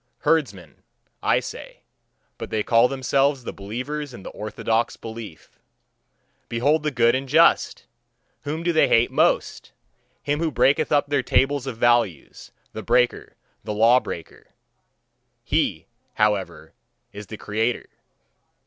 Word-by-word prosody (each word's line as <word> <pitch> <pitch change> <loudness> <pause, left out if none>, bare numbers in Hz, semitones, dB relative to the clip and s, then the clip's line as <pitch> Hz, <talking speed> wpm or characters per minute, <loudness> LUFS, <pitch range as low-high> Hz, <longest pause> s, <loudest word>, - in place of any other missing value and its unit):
Herdsmen, 100 - -1 0.4
I - - +2
say, - - -10 0.6
but - - -6
they 110 -1 -1
call 115 +2 +4
themselves 135 +1 0
the - - -6
believers 130 +7 -6
in 95 - -12
the - - -8
orthodox 110 +2 -2
belief. 110 -7 -10 0.9
Behold 140 +7 +1
the 150 - -1
good 120 -4 +3
and 130 +1 -3
just! 165 +4 +3 0.6
Whom 155 +4 -4
do 175 0 +1
they 160 - +4
hate 115 +1 +3
most? - - 0 0.5
Him 145 +1 -1
who 165 -1 0
breaketh 140 -1 +2
up 145 -1 +2
their 145 -2 +1
tables 135 +1 +1
of 125 -4 -5
values, 115 - 0 0.2
the - - -6
breaker, 125 -1 0 0.3
the 105 - -4
lawbreaker: 115 -6 +1 1.0
he, 120 - -1 0.3
however, 105 -3 -1 0.4
is 105 0 -9
the 110 - -8
creator. 110 +4 -2
120 Hz, 130 wpm, -23 LUFS, 110-145 Hz, 1.0 s, call